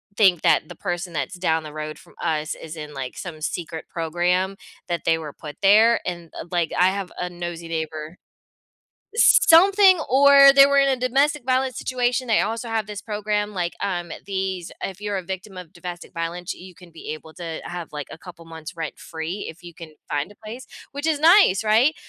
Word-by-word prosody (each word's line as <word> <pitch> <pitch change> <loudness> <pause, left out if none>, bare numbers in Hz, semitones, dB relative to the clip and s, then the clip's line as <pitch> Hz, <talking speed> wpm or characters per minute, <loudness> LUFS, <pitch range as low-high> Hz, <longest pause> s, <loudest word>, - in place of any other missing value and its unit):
think 190 -6 +4
that 155 - +3
the 175 - -9
person 175 0 -4
that's 145 0 -3
down 160 -3 0
the 150 -1 -9
road 155 0 -6
from - - -19
us 155 -2 -1
is 160 0 -9
in, 150 -1 -8
like, 135 -2 -6
some 165 -4 -7
secret 165 0 -5
program 180 +3 0 0.3
that 170 -1 -3
they 165 - +2
were 155 -3 -7
put 150 -1 -10
there," 220 +4 +6
and, 170 -2 -5
uh, - - -6
like, 170 -2 0
I 180 +1 +5
have 195 -2 -5
a 180 - -2
nosy 175 -1 -6
neighbor 160 0 -5 1.0
something 385 -2 +6
or 275 +1 +7
they 275 0 +9
were 280 0 +3
in 275 - +4
a 265 - +2
domestic 270 +3 +1
violence 255 0 0
situation, 250 0 -1
they 225 - +4
also 225 +2 -2
have 220 -2 -1
this 210 -1 -7
program, 210 -1 -2
like, 175 -3 -2
um, 175 -4 -2
these 190 -3 -3
if 195 +1 -5
you're 205 -1 -2
a 185 - -5
victim 190 +1 -7
of 180 -3 -10
domestic 175 0 -8
violence, 170 +1 -4
you 185 0 -13
can 175 0 -16
be 165 - -9
able 155 +1 -10
to 165 -3 -6
have, 175 -2 -7
like, 150 -1 -5
a - - -8
couple 170 -1 -13
months 160 -1 -9
rent-free 165 +3 -5
if 165 +3 -16
you 175 -1 -11
can 160 -2 -11
find 145 +7 -2
a - - -20
place, 225 +5 -10 0.3
which 285 +2 -4
is 310 -2 +1
nice, 330 - +6
right? 225 +8 +4
180 Hz, 200 wpm, -23 LUFS, 165-225 Hz, 1.0 s, they